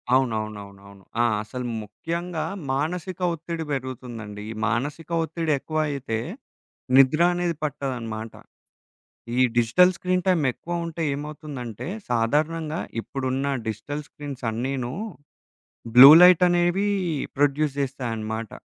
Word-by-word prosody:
అవునవునవునవును. 100 Hz, -5 st, -3 dB, 0.2 s
ఆ! -, -, +4 dB, 0.2 s
అసలు 125 Hz, +3 st, -6 dB, 0.2 s
ముఖ్యంగా 165 Hz, -, -4 dB, 0.3 s
మానసిక 170 Hz, +6 st, -2 dB
ఒత్తిడి 165 Hz, 0 st, -5 dB
బెరుగుతుందండి. 120 Hz, -6 st, -5 dB
ఈ -, -, -5 dB
మానసిక 145 Hz, +9 st, -2 dB
ఒత్తిడి 160 Hz, 0 st, -2 dB
ఎక్కువైతే, 145 Hz, -6 st, -2 dB, 0.8 s
నిద్ర 135 Hz, +4 st, +6 dB
అనేది 175 Hz, -2 st, -1 dB
పట్టదనమాట. 120 Hz, -6 st, -4 dB, 1.1 s
ఈ -, -, +4 dB, 0.2 s
డిజిటల్ 120 Hz, +11 st, +5 dB
స్క్రీన్ 180 Hz, 0 st, -1 dB
టైమ్ 175 Hz, -5 st, +3 dB
ఎక్కువ 170 Hz, +5 st, -4 dB
ఉంటే 165 Hz, 0 st, -4 dB
ఏమవుతుందంటే, 145 Hz, -5 st, -6 dB, 0.2 s
సాధారణంగా 155 Hz, +7 st, 0 dB, 0.2 s
ఇప్పుడున్న 135 Hz, +2 st, -2 dB
digital 145 Hz, +7 st, -4 dB
screens 140 Hz, -3 st, -8 dB
అన్నినూ 125 Hz, +2 st, -3 dB, 1.0 s
blue 130 Hz, +3 st, +12 dB
light 180 Hz, -1 st, +8 dB
అనేవీ 175 Hz, +3 st, +2 dB, 0.5 s
produce 145 Hz, 0 st, +2 dB
జేస్తాయనమాట. 115 Hz, -5 st, -3 dB
140 Hz, 100 wpm, -24 LUFS, 120-165 Hz, 1.1 s, blue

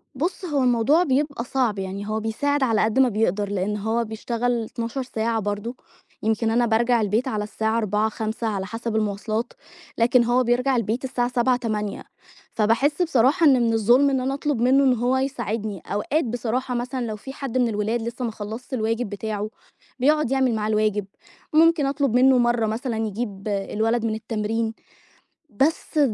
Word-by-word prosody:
بُصّ 350 Hz, +7 st, -2 dB
هو 290 Hz, -6 st, 0 dB
الموضوع 250 Hz, +7 st, +3 dB
بيبقى 285 Hz, -3 st, 0 dB
صعب 245 Hz, -6 st, 0 dB
يعني 195 Hz, +2 st, -5 dB
هو 215 Hz, +1 st, -1 dB
بيساعد 275 Hz, +6 st, 0 dB
على 225 Hz, -4 st, +2 dB
قد 220 Hz, +4 st, +1 dB
ما 260 Hz, -, +5 dB
بيقدر، 205 Hz, -2 st, 0 dB
لأن 205 Hz, +1 st, -1 dB
هو 220 Hz, +3 st, 0 dB
بيشتغل 235 Hz, +2 st, -2 dB
12 230 Hz, +4 st, -4 dB
ساعة 225 Hz, -2 st, -1 dB
برضه، 205 Hz, +4 st, -3 dB, 0.5 s
يمكن 220 Hz, +1 st, +1 dB
أنا 240 Hz, +1 st, +3 dB
بارجع 235 Hz, +1 st, +2 dB
البيت 215 Hz, +5 st, 0 dB
على 215 Hz, -4 st, -1 dB
الساعة 220 Hz, +1 st, -1 dB
16:00، 215 Hz, 0 st, +1 dB
17:00 220 Hz, +1 st, -3 dB
على 200 Hz, -3 st, -2 dB
حسب 225 Hz, +2 st, -4 dB
المواصلات، 215 Hz, +2 st, -2 dB, 0.4 s
لكن 240 Hz, +1 st, +4 dB
هو 245 Hz, +2 st, +2 dB
بيرجع 250 Hz, +3 st, +1 dB
البيت 230 Hz, +1 st, -1 dB
الساعة 245 Hz, -2 st, -1 dB
19:00، 245 Hz, +1 st, +3 dB
20:00 215 Hz, -4 st, -3 dB, 0.5 s
فباحس 235 Hz, +9 st, +2 dB
بصراحة 310 Hz, +1 st, +3 dB
إن 285 Hz, -, +7 dB
من 230 Hz, -1 st, +2 dB
الظُلم 240 Hz, +6 st, +4 dB
إن 270 Hz, -1 st, +1 dB
أنا 265 Hz, +2 st, -1 dB
أطلب 280 Hz, -3 st, -1 dB
منه 265 Hz, +3 st, +4 dB
إن 260 Hz, -2 st, +4 dB
هو 245 Hz, +2 st, +1 dB
يساعدني، 225 Hz, -6 st, -3 dB
أوقات 260 Hz, +10 st, -1 dB
بصراحة 245 Hz, +2 st, -2 dB
مثلًا 250 Hz, +1 st, -3 dB
لو 215 Hz, -2 st, -4 dB
في 265 Hz, +6 st, -9 dB
حد 270 Hz, -3 st, -4 dB
من 250 Hz, -1 st, +3 dB
الولاد 220 Hz, +2 st, -1 dB
لسه 235 Hz, +2 st, -4 dB
ما 230 Hz, -, -2 dB
خلصش 220 Hz, +5 st, -7 dB
الواجب 225 Hz, -1 st, -1 dB
بتاعُه 210 Hz, +1 st, -4 dB, 0.5 s
بيقعد 300 Hz, 0 st, +2 dB
يعمل 260 Hz, -3 st, +2 dB
معاه 215 Hz, 0 st, -1 dB
الواجب، 215 Hz, -2 st, +1 dB, 0.5 s
ممكن 325 Hz, -1 st, +5 dB
أطلب 275 Hz, -3 st, 0 dB
منه 255 Hz, +1 st, +5 dB
مرّه 240 Hz, -1 st, +2 dB
مثلًا 225 Hz, +2 st, -2 dB
يجيب 205 Hz, -1 st, -5 dB
الولد 220 Hz, +3 st, 0 dB
من 220 Hz, -1 st, 0 dB
التمرين، 220 Hz, 0 st, -2 dB, 0.8 s
بس 300 Hz, +6 st, 0 dB
230 Hz, 170 wpm, -23 LUFS, 215-255 Hz, 0.8 s, إن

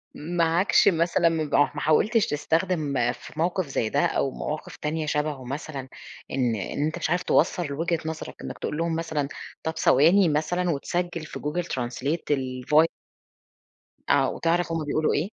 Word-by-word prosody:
معاكش 170 Hz, +4 st, +2 dB
مثلًا 170 Hz, -1 st, +3 dB
مبأ 155 Hz, -3 st, +2 dB
ح -, -, -13 dB
ما 145 Hz, -, -4 dB
حاولتِش 210 Hz, +8 st, +3 dB
تستخدم 150 Hz, -5 st, 0 dB
في 120 Hz, -, -12 dB
موقف 175 Hz, 0 st, 0 dB
زي 115 Hz, -5 st, -1 dB
ده 145 Hz, -, +2 dB
أو 135 Hz, -, 0 dB
مواقف 155 Hz, +1 st, -5 dB
تانية 155 Hz, +1 st, -2 dB
شبهه 150 Hz, -3 st, -2 dB
مثلًا 140 Hz, 0 st, -5 dB, 0.4 s
إن 125 Hz, -4 st, +1 dB
إن 140 Hz, +8 st, -2 dB
أنت 155 Hz, -, -2 dB
مش -, -, -2 dB
عارف 180 Hz, +1 st, +1 dB
توصَلّ 160 Hz, -6 st, +1 dB
وجهة 165 Hz, +2 st, 0 dB
نظرَك 160 Hz, 0 st, -5 dB
إنّك -, -, -6 dB
تقول 150 Hz, -, -3 dB
لهم 165 Hz, -1 st, 0 dB
مثلًا 160 Hz, -4 st, -2 dB, 0.4 s
طَب 160 Hz, 0 st, -3 dB
ثواني 170 Hz, +7 st, +5 dB
مثلًا 175 Hz, +4 st, 0 dB
وتسجِلّ 170 Hz, +3 st, -2 dB
في -, -, -7 dB
google 160 Hz, +4 st, -2 dB
translate 130 Hz, +6 st, -2 dB
الفوي 135 Hz, +4 st, +2 dB, 1.2 s
آه، -, -, +4 dB
وتعرف 170 Hz, 0 st, 0 dB
هُم 165 Hz, -2 st, -1 dB
بيقولوا 155 Hz, +1 st, +1 dB
إيه؟ 165 Hz, +7 st, 0 dB
155 Hz, 160 wpm, -25 LUFS, 145-170 Hz, 1.2 s, ثواني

